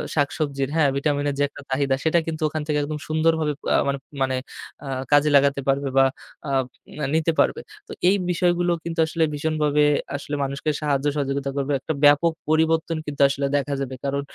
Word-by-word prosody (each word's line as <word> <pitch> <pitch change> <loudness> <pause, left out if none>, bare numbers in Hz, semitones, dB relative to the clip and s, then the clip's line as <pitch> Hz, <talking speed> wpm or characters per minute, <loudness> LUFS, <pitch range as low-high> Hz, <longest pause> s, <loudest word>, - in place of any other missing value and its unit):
শাকসবজির 140 -2 -1
হ্যাঁ 150 -4 +4
ভিটামিন 145 0 0
এর 140 - -3
যে - - +3
একটা - - -12
চাহিদা 135 0 +1
সেটা 165 +1 +3
কিন্তু 155 -1 -4
ওখান 155 0 -3
থেকে 150 -1 0
একদম 150 +1 -4
সুন্দরভাবে 155 -1 +1 0.2
আ - - +5
মান 140 - +1 0.3
মানে 130 -1 +1 0.5
এ্যা 135 - -5 0.2
কাজে 145 +1 +5
লাগাতে 140 0 +4
পারবে 135 +1 +1
বা 135 - +7 0.4
আ - - -2 0.6
নিতে 160 +1 +2
পারবে। - - +2 0.3
তো - - -11 0.2
এই 200 - +4 0.2
বিষয়গুলো 175 0 +1
কিন্তু 165 0 -5
আসলে 165 0 0
ভীষণভাবে 150 -1 +1 0.3
আসলে 145 +1 -4
মানুষকে 140 +3 -3
সাহায্য 145 -1 0
সহযোগিতা 140 -1 -1
করবে। 140 +1 -1
একটা 160 - -3
ব্যাপক 155 +3 +5 0.2
পরিবর্তন 160 +1 +2
কিন্তু 145 -1 -4
আসলে 140 0 -2
দেখা 140 0 -2
যাবে। 130 -1 -4
কারণ 140 0 -1
145 Hz, 180 wpm, -23 LUFS, 140-160 Hz, 0.6 s, বা